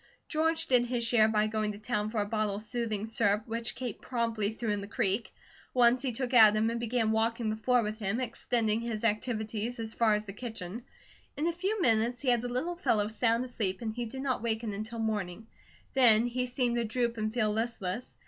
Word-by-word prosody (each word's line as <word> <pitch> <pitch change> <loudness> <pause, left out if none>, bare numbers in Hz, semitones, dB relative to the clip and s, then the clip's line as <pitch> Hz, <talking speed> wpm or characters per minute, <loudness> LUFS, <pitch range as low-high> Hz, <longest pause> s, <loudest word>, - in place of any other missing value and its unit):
George 320 +1 +1
did 250 -4 +3
his 240 -1 -1
share 230 -2 +4
by 215 -1 +2
going 215 -1 -1
to - - -9
town 215 -1 -2
for 220 -1 -1
a - - -1
bottle 215 -1 -1
of 210 - -5
soothing 220 -2 -3
syrup, 210 -2 +1
which 230 +1 -3
Kate 250 -4 -5
promptly 230 -4 -1
threw 225 0 -3
in 205 -1 -1
the 200 - -7
creek. 205 +1 -1 0.4
Once 245 0 +5
he 265 -2 0
took 250 +2 -3
Adam 220 -1 +6
and 235 - -3
began 235 -1 0
walking 225 0 +1
the - - -2
floor 245 +2 +2
with 215 +1 -4
him, 210 +3 -1
extending 230 -2 0
his 230 -2 -4
activities 220 +1 -1
as 225 -1 -5
far 220 -2 +3
as 210 +1 -3
the 195 - -7
kitchen. 220 -1 -6 0.5
In 300 - -1
a 340 - +1
few 385 +5 -2
minutes 230 +1 +2
he 270 - 0
had 240 -2 +3
the 245 - -4
little 265 +9 -2
fellow 215 - +1
sound 230 +2 +1
asleep 205 -7 -2
and 220 -1 -2
he 240 +1 -3
did 265 +4 -6
not 260 -4 -1
waken 225 -2 -2
until 215 +3 -5
morning; 215 -2 -2 0.5
then 235 -4 +6
he 250 +1 -1
seemed 245 -1 0
to 235 - +1
droop 235 +1 -1
and 215 0 -1
feel 220 -2 +1
listless. 225 -1 -3
230 Hz, 215 wpm, -30 LUFS, 215-245 Hz, 0.5 s, Adam